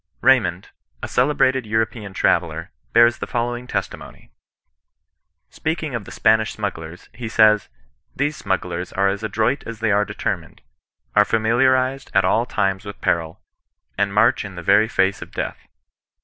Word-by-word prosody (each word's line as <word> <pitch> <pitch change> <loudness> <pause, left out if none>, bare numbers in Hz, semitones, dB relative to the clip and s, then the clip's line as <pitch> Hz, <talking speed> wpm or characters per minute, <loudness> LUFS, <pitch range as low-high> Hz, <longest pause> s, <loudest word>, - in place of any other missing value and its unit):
Raymond, - - +2 0.3
a - - -2
celebrated 130 -2 +1
European 110 -1 -2
traveller, - - 0 0.2
bears 120 0 +5
the - - -4
following 120 +1 -3
testimony: 95 -5 -6 0.6
— - - -57
Speaking 155 -2 -3
of 115 -4 -4
the - - -11
Spanish 110 0 +2
smugglers, 85 -5 -6
he 120 -2 -6
says: 110 -2 +4 0.2
" - - -45
These 145 +2 -1
smugglers 90 -6 -3
are 100 +1 +2
as 100 +1 -3
adroit 110 +5 0
as 115 -1 -7
they 115 -1 +1
are 100 +1 +3
determined, - - -4 0.5
are 105 - +7
familiarized 130 +5 +1
at 95 -1 +4
all 115 +6 +2
times 95 -3 -1
with 100 0 -9
peril, 80 -1 -1 0.5
and 100 0 0
march 105 +4 +3
in 100 -2 -9
the 90 - -7
very 110 +6 +4
face 95 -2 +1
of - - -9
death. - - -5
110 Hz, 155 wpm, -21 LUFS, 100-120 Hz, 0.6 s, are